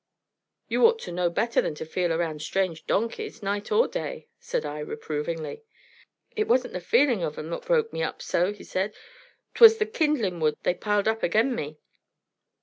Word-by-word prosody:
"You 460 - +5
ought 460 0 +1
to - - -6
know 175 0 +1
better 230 +7 +1
than 150 - -3
to 155 - -6
feel 175 +2 -1
around 160 -2 -1
strange 180 -1 -2
donkeys, 225 0 -2
night 205 +1 -2
or 460 +2 +4
day," - - -5
said - - -3
I, 150 0 -5
reprovingly. 155 - -4 0.7
"It 430 -1 0
wasn't 255 0 +2
th' 180 - -3
feelin' 240 -1 +3
of 155 -2 -3
'em 155 +2 -6
what - - -5
broke 465 -2 +2
me - - -3
up - - -3
so," 180 +3 0
said 205 0 -3
he. - - -19 0.5
"'Twas 455 -1 +9
the 430 - +1
kindlin' 295 - 0
wood 155 -1 +1
they - - +2
piled 205 +2 0
up 225 0 +1
again 225 +9 +2
me." 150 -8 -5
200 Hz, 185 wpm, -26 LUFS, -, 0.7 s, Twas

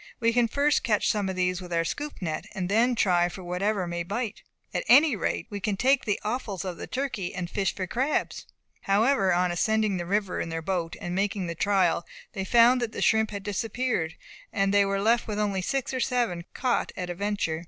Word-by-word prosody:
We 230 -1 +2
can 240 -1 +3
first 285 +5 +2
catch 210 -3 +2
some 205 -3 -1
of 190 - -3
these 180 0 0
with 180 -1 -9
our 165 0 +1
scoop 290 - -5
net, 155 -3 -3
and 185 -3 -2
then 235 +4 +3
try 175 -5 +3
for 185 +1 -9
whatever 185 +2 -1
may 175 0 -3
bite. 210 +5 -3 0.3
At - - -1
any 275 +2 +6
rate - - -2
we 205 - -4
can 200 0 -1
take 265 +5 +3
the 210 -3 0
offals 210 -5 -3
of 180 -2 -4
the - - -7
turkey, 250 -10 -3
and 180 -2 -3
fish 195 +2 -1
for 185 - -3
crabs." 260 +10 -1 0.4
However, 205 0 +3
on 180 0 +2
ascending 215 +2 +1
the 175 -1 -4
river 200 -1 0
in 165 - -4
their 165 0 -3
boat, 170 -2 -2
and 175 - -4
making 200 0 -1
the 170 - -3
trial, 185 -1 +2 0.3
they 195 - -3
found 240 +5 +5
that 230 -2 -2
the - - -4
shrimp 220 -1 +3
had 200 -2 -6
disappeared, 210 -4 -2 0.4
and 195 0 +1
they 200 0 +5
were 195 0 0
left 230 +4 +2
with 210 -2 -3
only 200 -3 0
six 270 +7 -2
or 260 - -1
seven 235 -10 0
caught 250 -2 0
at 180 -1 -3
a - - -2
venture. 200 -4 -1
200 Hz, 220 wpm, -27 LUFS, 180-230 Hz, 0.4 s, any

